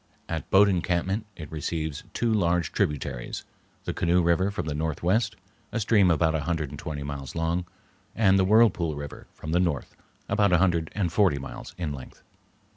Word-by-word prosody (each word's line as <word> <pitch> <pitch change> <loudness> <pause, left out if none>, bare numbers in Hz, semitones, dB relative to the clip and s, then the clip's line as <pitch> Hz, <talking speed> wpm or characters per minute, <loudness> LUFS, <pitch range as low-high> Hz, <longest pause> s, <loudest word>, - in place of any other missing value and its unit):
At - - -4
Boat 100 +1 +6
Encampment 95 +3 0
it 75 -3 -9
receives 80 -1 -3
two 115 -2 0
large 85 -5 +1
tributaries, 65 -4 -2 0.4
the - - -3
Canoe 90 +1 +2
River 85 +3 +3
from 100 - -4
the 75 - -2
northwest, 85 +8 0 0.4
a - - -1
stream 100 -3 +4
about 80 -1 +3
a 80 - +1
hundred 80 -2 -2
and 70 - -8
twenty 75 -4 -5
miles 70 -2 -6
long; 85 +2 -1 0.5
and 95 -3 +4
the - - +4
Whirlpool 95 -7 +4
River 70 0 -8
from 75 - -6
the 85 - +3
north, 85 -7 -1 0.3
about 100 -2 +3
a - - +6
hundred 85 -3 +2
and 90 -5 0
forty 95 -8 +4
miles 70 - -8
in 85 -5 -2
length. 65 -2 -11
85 Hz, 180 wpm, -26 LUFS, 75-95 Hz, 0.5 s, Boat